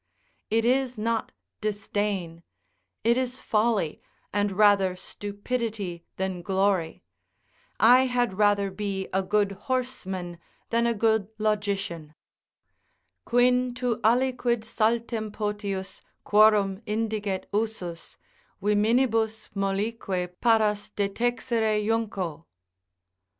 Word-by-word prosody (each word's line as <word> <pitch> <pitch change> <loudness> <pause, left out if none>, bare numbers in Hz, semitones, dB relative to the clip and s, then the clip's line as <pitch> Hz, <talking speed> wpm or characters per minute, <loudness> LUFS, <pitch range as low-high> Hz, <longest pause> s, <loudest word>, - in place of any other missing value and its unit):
It 225 +1 +2
is 255 0 +1
not 225 +1 -1 0.3
disdain; 205 -5 -2 0.6
it 235 +2 +3
is 255 0 -1
folly, 215 -7 0 0.3
and 205 0 +1
rather 195 -2 +4
stupidity 205 -2 -4
than 190 -2 -3
glory; 190 -2 0 0.8
I 250 +3 +6
had 245 -5 0
rather 205 -1 +3
be 195 -1 -3
a 190 - +2
good 205 +1 +1
horseman 190 -6 -3 0.3
than 235 0 +2
a 235 - +1
good 220 -2 +2
logician: 200 -7 -2 1.1
"Quin 250 +1 +3
to 245 -3 -1
aliquid 240 0 +2
saltem 225 0 0
potius, 200 -2 -3 0.2
quorum 210 -2 +4
indiget 210 -3 -2
usus, 205 -6 -3 0.4
Viminibus 220 +2 +1
mollique 195 -2 -2
paras 215 -3 +2
detexere 220 +1 0
junco." 200 -8 -2
210 Hz, 90 wpm, -26 LUFS, 195-230 Hz, 1.1 s, I